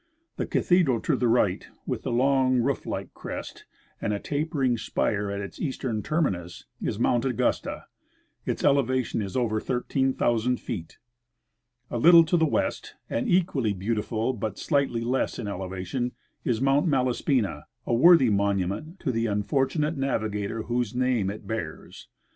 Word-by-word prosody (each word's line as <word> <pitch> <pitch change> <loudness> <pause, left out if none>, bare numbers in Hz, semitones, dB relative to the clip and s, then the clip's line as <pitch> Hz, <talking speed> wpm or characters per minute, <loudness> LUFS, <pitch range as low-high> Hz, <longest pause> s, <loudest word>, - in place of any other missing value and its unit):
The - - -2
cathedral 170 -10 +3
to 150 - +1
the 125 -1 +1
right, 110 -5 +2 0.2
with - - -3
the - - -3
long 130 +1 +3
roof 130 +3 0
like - - -4
crest - - -7 0.4
and 105 - -1
a 100 - -2
tapering 145 -3 0
spire 105 -1 -1
at 100 0 -3
its 100 - -8
eastern 130 -6 -2
terminus, 95 - -2 0.2
is 105 - -2
Mount 120 +1 +2
Augusta; 125 -4 -1 0.6
its - - -3
elevation 130 -4 +2
is 100 +3 -4
over 110 -3 +1
13,000 125 -2 0
feet. 85 -9 -6 0.9
A 120 - -1
little 170 +5 +8
to 165 - +1
the 160 -2 +3
west, - - -2 0.2
and 115 - -1
equally 165 - +2
beautiful 110 +4 -1
but 110 -3 -4
slightly 140 -6 0
less 125 +3 -1
in 115 - -4
elevation, 95 +6 -3 0.3
is 115 -3 0
Mount 135 +5 +3
Malaspina 125 - +1
— - - -48
a - - -3
Avorthy 135 0 +6
monument 100 - -1
to 135 - 0
the 115 -1 0
unfortunate 135 +9 0
navigator 110 -5 -2
whose 120 -1 -2
name 125 -6 +1
it 105 +2 -7
bears. 90 -9 -6
120 Hz, 150 wpm, -26 LUFS, 105-135 Hz, 0.9 s, little